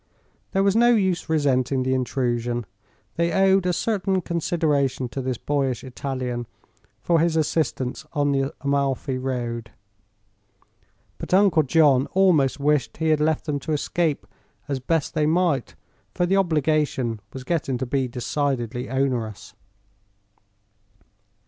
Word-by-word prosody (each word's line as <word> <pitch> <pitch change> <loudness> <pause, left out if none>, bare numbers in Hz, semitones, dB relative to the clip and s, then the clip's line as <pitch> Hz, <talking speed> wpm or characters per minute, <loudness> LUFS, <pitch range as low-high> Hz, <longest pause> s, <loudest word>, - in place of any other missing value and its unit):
There 195 -1 +2
was 200 0 +2
no 240 +1 +5
use 190 -5 0
resenting 135 -4 +1
the 130 0 0
intrusion. 120 -2 -1 0.5
They 170 0 +1
owed 195 -1 +3
a - - +3
certain 190 -1 0
consideration 150 -6 0
to 135 - -4
this 130 -2 -2
boyish 135 -4 -1
Italian 130 -2 -4 0.6
for 170 -1 +3
his 165 0 +2
assistance 150 -5 -1
on 145 -2 +1
the 135 0 0
Amalfi 140 -1 0
road. 120 -3 -3 1.5
But - - 0
Uncle 190 -5 +5
John 140 -2 +3
almost 165 -9 +3
wished 145 -3 +1
he 160 0 0
had 155 -1 +3
left 155 0 +1
them 145 -3 -1
to 155 - -3
escape 155 +1 -1 0.4
as 140 -2 -2
best 155 +3 -1
they 155 -2 +1
might, 160 -5 +1 0.4
for 175 - +1
the 190 +2 +1
obligation 150 - +1
was 130 - -8
getting 140 -4 -1
to 130 - -3
be 130 +1 0
decidedly 125 -1 -2
onerous. 120 -6 -2
140 Hz, 130 wpm, -23 LUFS, 130-165 Hz, 1.5 s, no